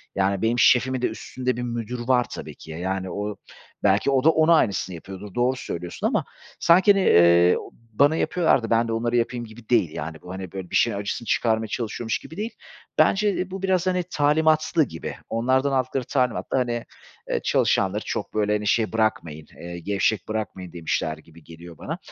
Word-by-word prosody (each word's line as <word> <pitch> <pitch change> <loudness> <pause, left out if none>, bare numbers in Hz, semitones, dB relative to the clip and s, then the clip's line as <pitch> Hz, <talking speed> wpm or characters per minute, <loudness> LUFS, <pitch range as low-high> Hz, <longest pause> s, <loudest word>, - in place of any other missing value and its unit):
Yani, 100 0 +1
benim 115 +2 +1
şefimin 130 +1 +4
de - - +2
üstünde 125 -1 -4
bir 125 - -3
müdür 120 0 -4
var, 125 -2 +3
tabii - - -7
ki. 80 - -12
Ya, 80 - -6
yani, 95 +1 -3
o 105 0 -4 0.5
belki 100 +7 +3
o 130 -1 +2
da 160 - +6
ona 160 +1 +5
aynısını 95 - 0
yapıyordur, 95 +4 -10
doğru 125 +2 +2
söylüyorsun 90 -8 -4
ama - - 0 0.3
sanki, 180 +4 +6
hani, 195 -1 +1
eee, 85 - +6 0.4
bana 145 +7 +4
yapıyorlar 160 -6 +2
da 115 - -4
ben 115 0 +2
de - - -3
onlara 115 +1 -1
yapayım 120 0 0
gibi 110 0 -14
değil, 115 -9 +3
yani, 80 +1 -6
bu 90 - -10
hani, 95 -2 -7
böyle, 95 -2 -7
bir - - -4
şeyin 115 -4 +3
acısını 100 +3 -4
çıkarmaya 110 -1 +1
çalışıyormuş 110 0 -3
gibi 160 - -12
değil. 220 +3 -3 0.5
Bence, 205 0 +3
eee, 185 +1 -3
bu 190 0 -5
biraz, 185 -1 +1
hani, 180 -1 +1
talimatlı 155 +2 +3
gibi, 80 - -6
onlardan 130 +4 +1
aldıkları 130 0 0
talimatla, 125 0 -1
hani, 120 -2 -2 0.4
eee, - - 0
çalışanları - - +1
çok, - - -4
böyle, 105 -1 +1
hani, 105 0 -1
şey 110 +2 +1
bırakmayın, 85 -9 -1 0.2
eee, 85 0 -7
gevşek 100 +2 0
bırakmayın 105 -5 -5
demişler 80 -2 -2
gibi 80 +1 -18
geliyor 85 +1 -12
bana. - - -5
115 Hz, 190 wpm, -24 LUFS, 95-130 Hz, 0.5 s, da